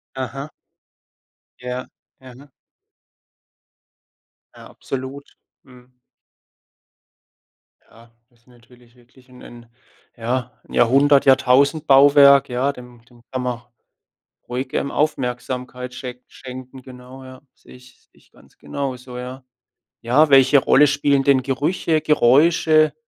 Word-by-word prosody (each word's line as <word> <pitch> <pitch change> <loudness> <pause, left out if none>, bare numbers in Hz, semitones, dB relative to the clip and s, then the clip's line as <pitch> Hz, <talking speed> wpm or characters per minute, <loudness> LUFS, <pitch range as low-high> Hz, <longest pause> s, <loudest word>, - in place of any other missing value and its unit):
Aha. 135 +3 -6 1.1
Ja. 125 0 -6 0.3
Mhm. 130 +2 -16 2.1
Ja. - - -14
Absolut. 135 +1 -7 0.4
Mhm. 125 -1 -21 1.8
Ja, 115 0 -22 0.2
das 120 -2 -33
ist 115 - -40
natürlich 120 0 -23
wirklich 125 +1 -24
'n 125 0 -17
'n 120 -1 -14 0.5
ja, 120 +1 -4 0.2
'n - - -15
Jahrhundert, 140 +4 +3
Jahrtausendbauwerk, 140 +1 +4
ja, 130 +3 -1
dem 125 -2 -15
dem 120 0 -23
kann 130 -1 -4
man 125 -1 -4 0.9
ruhig, 130 +2 -5
ähm, 140 - -2
Aufmerksamkeit 125 -2 -4
schenk 125 -1 -9
schenken, 130 0 -12
genau, 130 +1 -14
ja. 130 0 -13
Sehe - - -19
ich 125 0 -20
sehe - - -38
ich - - -28
ganz - - -24
genauso, 130 -2 -7
ja. 130 +1 -9 0.6
Ja, 135 +7 +2
welche 135 +1 +5
Rolle 140 +2 +4
spielen 140 0 0
denn 135 -2 +3
Gerüche, 150 +4 -1
Geräusche 155 +3 +3
130 Hz, 110 wpm, -20 LUFS, 125-140 Hz, 2.1 s, welche